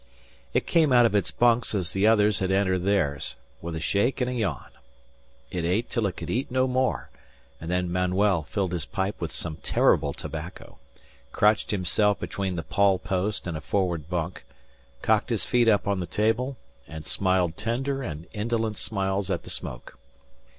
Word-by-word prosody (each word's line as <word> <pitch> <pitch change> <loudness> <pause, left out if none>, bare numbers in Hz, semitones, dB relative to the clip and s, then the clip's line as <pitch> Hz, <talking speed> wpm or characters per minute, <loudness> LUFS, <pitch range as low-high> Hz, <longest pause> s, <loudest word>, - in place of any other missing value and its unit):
It - - +1
came 160 -4 +3
out 120 -1 +7
of 110 - +2
its 100 - +2
bunks 120 -2 +2
as 90 -5 -1
the 95 +2 +3
others 105 -2 +4
had 95 - 0
entered 95 -1 +2
theirs, 70 -11 +1 0.3
with 85 -1 -5
a - - -3
shake 100 +11 +1
and 125 - +1
a - - -3
yawn. 100 - -2 0.8
It 90 -2 -2
ate 95 +8 0
till 115 -4 +1
it 90 - -6
could - - -5
eat 125 +4 -1
no 130 0 +2
more; 130 0 0 0.5
and 80 - -7
then 90 0 0
Manuel 90 +1 +2
filled 95 +4 -2
his 85 -5 -2
pipe 95 +12 -3
with 85 - -3
some 80 -3 -4
terrible 70 - +2
tobacco, 80 +4 -8 0.5
crotched 105 0 +3
himself 105 +1 +1
between 95 -2 -3
the 85 - -3
pawl 100 -1 +3
post 100 +2 -2
and 85 -3 -3
a 80 - -5
forward 85 -6 -1
bunk, 85 0 -3 0.6
cocked 110 +2 +2
his 115 -4 0
feet 120 -2 +3
up 105 -2 +3
on 100 -2 +1
the 90 - -3
table, 115 +8 0 0.3
and 80 -2 -8
smiled 95 0 +1
tender 135 +7 -2
and 80 - -5
indolent 110 0 -1
smiles 95 -1 -1
at - - -1
the - - -7
smoke. - - -4
100 Hz, 180 wpm, -26 LUFS, 90-110 Hz, 0.8 s, out